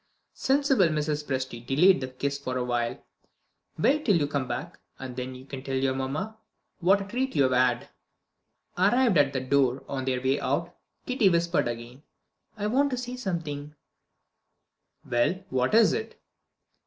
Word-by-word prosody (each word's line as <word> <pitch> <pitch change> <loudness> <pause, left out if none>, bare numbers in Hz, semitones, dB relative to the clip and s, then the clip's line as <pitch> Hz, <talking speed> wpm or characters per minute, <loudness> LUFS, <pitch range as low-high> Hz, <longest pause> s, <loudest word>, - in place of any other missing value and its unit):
Sensible 270 -8 +3
Mrs. 150 -1 -1
Presty 130 -4 -4
delayed 145 +6 +4
the 130 - -3
kiss 140 +2 -3
for 130 -2 -3
a 125 - 0
while. 120 -1 -1 0.8
"Wait 290 - +2
till 205 -9 +3
you 155 -4 +2
come 140 -2 -2
back, 120 - -5 0.2
and 130 -2 -7
then 130 0 -5
you 130 +1 -11
can 135 -1 -7
tell 135 0 -4
your 130 0 +1
mamma 150 +12 -4 0.4
what 195 +3 +4
a - - -5
treat 260 +5 -2
you 140 - +4
have 130 - +2
had." 125 -1 +2 0.9
Arrived 210 - +4
at 140 -1 +4
the 130 - -1
door 130 -1 +1
on 135 -2 -3
their 130 -1 0
way 135 +2 +1
out, 170 +6 -2 0.3
Kitty 250 -6 +3
whispered 170 -4 +1
again: 120 +3 -6 0.6
"I 205 - -3
want 270 +7 +2
to 255 - -2
say 250 0 -5
something" 155 - -4 1.3
"Well, 120 +11 0
what 130 +8 +1
is 230 -1 +6
it?" 445 0 -5
145 Hz, 165 wpm, -27 LUFS, 130-195 Hz, 1.3 s, is